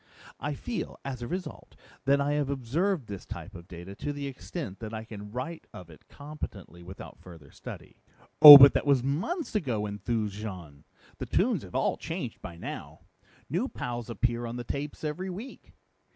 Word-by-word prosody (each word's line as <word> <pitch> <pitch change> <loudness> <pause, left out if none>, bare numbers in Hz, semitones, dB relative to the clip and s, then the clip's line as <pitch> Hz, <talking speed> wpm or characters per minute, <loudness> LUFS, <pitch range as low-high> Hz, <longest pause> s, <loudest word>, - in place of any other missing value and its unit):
I 145 0 -3
feel, 235 - -5
as 130 -3 -5
a 120 - -4
result, 180 +4 -6 0.3
that 140 +1 +4
I 140 +1 0
have 145 -2 0
observed 140 - -1
this 100 -3 -8
type 105 - -9
of 85 -2 -11
data 90 +2 -9
to 145 - -3
the 145 -1 -5
extent 135 - -6
that 110 -1 -6
I 110 - -5
can 105 -2 -9
write 160 +8 -6
of 85 -2 -11
it 75 - -18
competently 140 - -9
without 95 +2 -11
further 80 -6 -14
study." - - -11 0.4
"Oh, 150 -2 +16
but 140 0 +9
that - - -1
was 135 -3 +3
months 190 - -2
ago," 125 - -1
enthused 105 +1 -2
Jean. 90 -9 -8 0.3
"The - - -5
tunes - - +1
have - - -11
all - - +1
changed - - -6
by 85 - -9
now. - - -8 0.5
New 180 - -1
pows 120 - -5
appear 120 0 -1
on 115 - -6
the 120 - -5
tapes 140 +5 -5
every 165 +5 -3
week. 210 +9 -9
125 Hz, 180 wpm, -28 LUFS, 105-150 Hz, 0.5 s, Oh